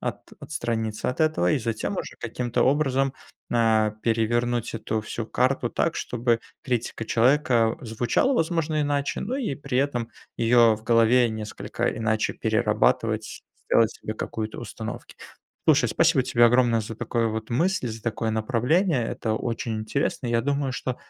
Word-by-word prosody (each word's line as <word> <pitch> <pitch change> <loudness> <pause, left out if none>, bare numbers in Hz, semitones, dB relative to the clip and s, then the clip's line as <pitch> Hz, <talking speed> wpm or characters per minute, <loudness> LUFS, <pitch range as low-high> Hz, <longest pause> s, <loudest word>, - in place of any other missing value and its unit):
ат - - -5
отстраниться 115 -6 -3
от 125 - -6
этого 155 - +2
и - - +2
затем 115 - -3
уже - - -5
каким-то 120 +1 -1
образом, 135 -1 +2 0.4
а, 110 -2 +3
перевернуть 120 +1 0
эту 110 0 -2
всю 110 +1 -5
карту 125 0 0
так, 170 - 0
чтобы 120 -1 0 0.2
критика 120 -3 -2
человека 120 -1 +3
звучала, 120 - +1
возможно, 165 -5 0
иначе, 145 -1 -1
но 245 +6 -2
и 240 - -2
при 140 -2 -3
этом 125 -4 0 0.3
её 115 -1 +5
в 110 - -11
голове 115 +2 +4
несколько 110 -1 -4
иначе 110 -1 0
перерабатывать, 110 -1 0 0.3
делать 115 -1 +4
себе 110 - -6
какую-то 110 0 -5
установки. 110 -1 -7 0.5
Слушай, - - +5
спасибо 155 -6 +3
тебе 120 -2 +4
огромное 120 -1 +3
за 110 +1 -7
такое 115 0 -1
вот 110 0 -4
мысль, 165 +4 +1
за 110 0 -7
такое 115 0 -2
направление. 125 - +1
Это 110 -1 -2
очень 115 0 -3
интересно. 130 +7 -2
Я 120 -1 +1
думаю, 140 +1 -1
что, 125 0 -3
120 Hz, 150 wpm, -25 LUFS, 110-135 Hz, 0.5 s, её